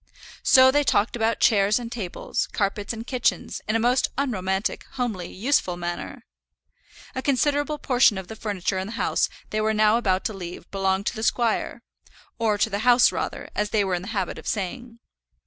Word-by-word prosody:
So 260 0 +6
they 290 +2 +3
talked 215 -4 +1
about 225 0 0
chairs 205 -1 +4
and 235 -2 -5
tables, 220 +1 -3
carpets 200 -1 -1
and 225 0 -6
kitchens, 245 -2 -1
in 215 - 0
a - - +3
most 245 +3 +2
unromantic, 195 -8 -1
homely, 225 -9 -3
useful 195 -5 0
manner! 175 0 -5 0.9
A 260 - -3
considerable 290 +2 +1
portion 250 -7 +3
of 190 -2 -6
the 220 - -8
furniture 200 -3 -2
in 190 - -4
the 220 - -7
house - - 0 0.2
they 215 - 0
were 220 0 +1
now 215 +1 +4
about 190 -5 0
to 220 - -1
leave 180 -3 -8
belonged 195 0 0
to - - -1
the 220 - -5
squire, 230 0 0 0.6
or 220 -2 +1
to 215 - +1
the 200 - -1
house 245 +2 +5
rather, - - -4
as 210 0 -1
they 210 -1 +2
were 190 -2 -1
in 175 - -1
the 190 - -9
habit 215 -2 -3
of - - -11
saying. 230 +4 -4
220 Hz, 190 wpm, -24 LUFS, 195-245 Hz, 0.9 s, So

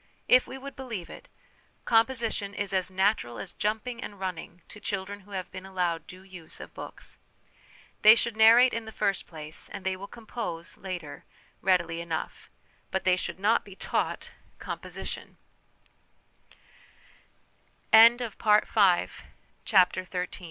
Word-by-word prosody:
If 255 - +5
we 265 - -7
would 275 +1 -9
believe 230 -10 -6
it, - - -12 0.6
composition 225 -4 +1
is 200 -1 -2
as 185 -1 +1
natural 185 - 0
as 195 - -6
jumping 220 +3 -2
and 205 - -8
running 180 -2 -6
to 210 - -11
children 200 0 -4
who 205 +1 -19
have 185 -1 -6
been 185 0 -8
allowed 175 -4 -2
due 185 +1 -12
use 180 -4 -9
of - - -10
books. - - -8 0.8
They 215 +1 +9
should 235 -1 -1
narrate 230 +3 +7
in 230 -1 -3
the 220 - -8
first 200 -3 -1
place, 155 -2 -5
and 195 - -8
they 190 0 0
will 195 +2 -8
compose, 215 -7 -6
later, 175 -6 -7 0.4
readily 170 -3 +1
enough; 165 -2 -5 0.4
but 190 - -2
they 185 -1 +4
should 185 - -5
not 215 +4 +3
be 195 - -13
taught - - -2
' - - -33
com - - -5
195 Hz, 130 wpm, -28 LUFS, 180-220 Hz, 0.8 s, They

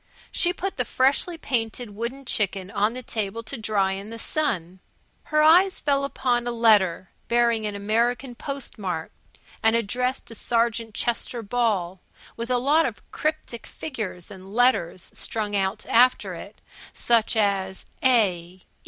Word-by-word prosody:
She 350 -2 +2
put 385 +2 -4
the 250 - +1
freshly 275 +8 +1
painted 240 -5 -2
wooden 235 +6 -5
chicken 195 -4 -1
on 210 +3 +1
the 255 - -6
table 220 0 -3
to 225 +5 -5
dry 210 -4 0
in 195 +2 -5
the 230 - -7
sun. 190 - -2 0.5
Her 305 0 +2
eyes 360 +5 +6
fell 280 -1 +1
upon 245 -3 0
a - - 0
letter 210 -6 +3 0.2
bearing 235 -2 +2
an 205 - -4
American 235 +5 0
postmark 220 - -4 0.5
and 225 +1 +4
addressed 250 +4 -1
to - - -9
Sergeant 230 -1 0
Chester 240 0 -2
Ball, 200 -5 0 0.3
with 235 +1 -5
a 250 - +3
lot 290 +6 +3
of 220 -5 -9
cryptic 310 -6 -3
figures 210 - -6
and 190 +1 -11
letters 240 -8 +2
strung 210 -2 -2
out 195 +2 -1
after 250 +2 +4
it, - - -10 0.3
such 230 -1 +2
as 195 -3 0 0.2
A. 185 -8 +2
230 Hz, 145 wpm, -25 LUFS, 200-250 Hz, 0.5 s, eyes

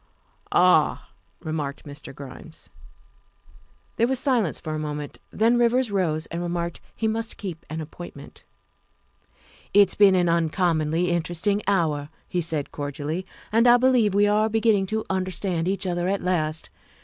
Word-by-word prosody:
"Ah," - - +3 0.3
remarked 150 -3 -4
Mr. 145 -1 -10
Grimes. 140 +4 -12 1.3
There 230 - +3
was 265 +1 0
silence 245 - +1
for 155 - -5
a 155 - -2
moment, 150 -1 -5
then 230 +3 +2
Rivers 240 0 +2
rose 165 -5 0
and 170 +1 -3
remarked 170 -1 -3
he 225 - -1
must 225 +1 -2
keep 175 -5 -6
an 160 +1 -4
appointment. 165 +3 -10 0.6
" - - -31
It's 200 -2 +6
been 200 -2 +5
an 180 -1 +3
uncommonly 165 0 +1
interesting 175 +4 0
hour," 155 -7 +1 0.2
he 180 - -1
said 155 -3 -3
cordially, 145 +5 -4
" - - -23
and 230 +3 +4
I 240 0 +8
believe 245 -5 +3
we 205 0 +5
are 210 +1 +2
beginning 220 -3 +2
to 220 +2 -2
under 185 -1 -1
stand 180 -2 -2
each 195 +1 -2
other 175 -1 -1
at 200 +1 -1
last. 160 -4 -1
180 Hz, 155 wpm, -24 LUFS, 160-210 Hz, 1.3 s, I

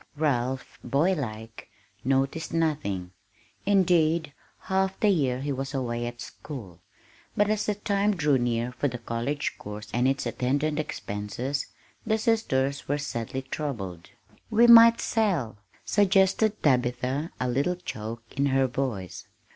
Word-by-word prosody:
Ralph, 130 -4 -1
boylike, 120 - -1 0.3
noticed 135 +5 0
nothing 120 - -1 0.6
indeed, 170 -6 +3 0.3
half 190 0 0
the 210 - +3
year 135 -9 +1
he 145 +1 -2
was 135 +1 -4
away 120 -2 -2
at 120 0 -7
school; 105 - -9 0.6
but 205 +1 +3
as 215 -1 -1
the 210 - +1
time 205 0 +1
drew 150 -5 +2
near 120 0 0
for 135 +3 -1
the 125 -2 -4
college 120 +5 -3
course 105 0 -8
and 125 +2 +2
its 135 +1 0
attendant 145 +4 0
expenses, 120 +1 -3 0.4
the 220 0 +1
sisters 140 - 0
were 145 - +1
sadly 130 -2 -4
troubled. 115 - -5 0.4
"We 230 +2 +5
might 230 0 +9
sell," 180 - 0 0.3
suggested 205 +2 +3
Tabitha, 125 +2 +1
a 125 - 0
little 140 +9 +1
choke 115 -9 -6
in 140 0 +2
her 135 0 +3
voice. 120 -8 -4
135 Hz, 130 wpm, -27 LUFS, 120-175 Hz, 0.6 s, might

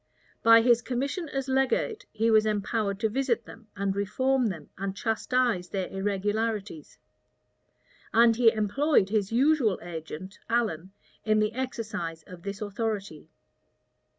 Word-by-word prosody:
By 230 0 +7
his 240 -1 +4
commission 275 +7 -3
as 270 -1 -3
legate 270 - 0
he 225 +1 +1
was 215 0 +5
empowered 210 -1 -1
to 220 - +3
visit 240 0 -1
them, 225 -1 -13
and 195 0 -1
reform 255 +6 +1
them, 180 -6 -6
and 195 0 -4
chastise 225 -4 0
their 190 -2 -2
irregularities; 205 -2 -2 1.1
and 230 0 +5
he 230 -1 +5
employed 220 +1 +2
his 205 -1 0
usual 255 -4 +3
agent, 170 +2 -8
Allen, 205 -7 -1 0.3
in 215 -1 +2
the 215 +1 +1
exercise 215 -10 -4
of 180 +1 -12
this 200 +3 -6
authority. 205 -6 -4
215 Hz, 130 wpm, -27 LUFS, 195-240 Hz, 1.1 s, By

